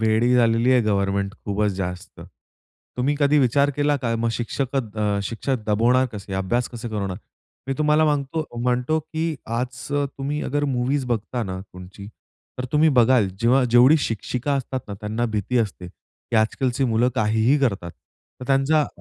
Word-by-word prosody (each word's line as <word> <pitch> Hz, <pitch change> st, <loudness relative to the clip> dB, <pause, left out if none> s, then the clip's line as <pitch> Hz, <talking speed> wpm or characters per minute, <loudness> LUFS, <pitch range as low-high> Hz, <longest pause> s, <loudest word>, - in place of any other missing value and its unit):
वेडी 110 Hz, +3 st, +2 dB
झालेली 115 Hz, +1 st, +3 dB
आहे 125 Hz, -, +5 dB
गव्हर्नमेंट 100 Hz, -1 st, 0 dB
खूपच 105 Hz, 0 st, 0 dB
जास्त. 90 Hz, -1 st, -6 dB, 0.8 s
तुम्ही 135 Hz, +4 st, +1 dB
कधी 145 Hz, 0 st, +3 dB
विचार 140 Hz, +2 st, +3 dB
केला 145 Hz, 0 st, +2 dB
का? 120 Hz, -3 st, -2 dB
मग 115 Hz, +1 st, 0 dB
शिक्षकत 120 Hz, -2 st, -3 dB
अ, 105 Hz, -1 st, 0 dB
शिक्षक 115 Hz, +3 st, -3 dB
दबवणार 120 Hz, +5 st, +3 dB
कसे? 100 Hz, -2 st, -8 dB
अभ्यास 115 Hz, +6 st, -1 dB
कसे 120 Hz, -1 st, -7 dB
करवणार? 100 Hz, -4 st, -3 dB, 0.5 s
मी 135 Hz, -, 0 dB
तुम्हाला 150 Hz, +1 st, +3 dB
म्हणतो, 150 Hz, +1 st, 0 dB, 0.2 s
म्हणतो 125 Hz, +5 st, +1 dB
की 160 Hz, +1 st, -3 dB
आज 120 Hz, +2 st, -4 dB
तुम्ही 145 Hz, +1 st, -2 dB
अगर 145 Hz, +2 st, -1 dB
मूवीज 130 Hz, +3 st, 0 dB
बघता 120 Hz, +1 st, -2 dB
ना 95 Hz, -3 st, -5 dB
तुमची, 95 Hz, +1 st, -12 dB, 0.5 s
तर 125 Hz, -, -3 dB
तुम्ही 155 Hz, +2 st, +4 dB
बघाल, 120 Hz, -3 st, +4 dB
जेव्हा 125 Hz, +3 st, +4 dB
जेवढी 125 Hz, +6 st, +7 dB
शिक्षिका 125 Hz, +3 st, -2 dB
असतात 130 Hz, -1 st, -3 dB
ना 100 Hz, -, -5 dB
त्यांना 110 Hz, +3 st, -2 dB
भीती 115 Hz, +4 st, 0 dB
असते, 100 Hz, -5 st, -2 dB
की 115 Hz, +5 st, -8 dB
आजकालची 125 Hz, +4 st, +1 dB
मुलं 120 Hz, +1 st, +2 dB
काहीही 110 Hz, +6 st, +2 dB
करतात. 100 Hz, -10 st, -1 dB, 0.5 s
तर -, -, -6 dB
त्यांचा 140 Hz, +2 st, +2 dB
120 Hz, 160 wpm, -23 LUFS, 105-135 Hz, 0.8 s, जेवढी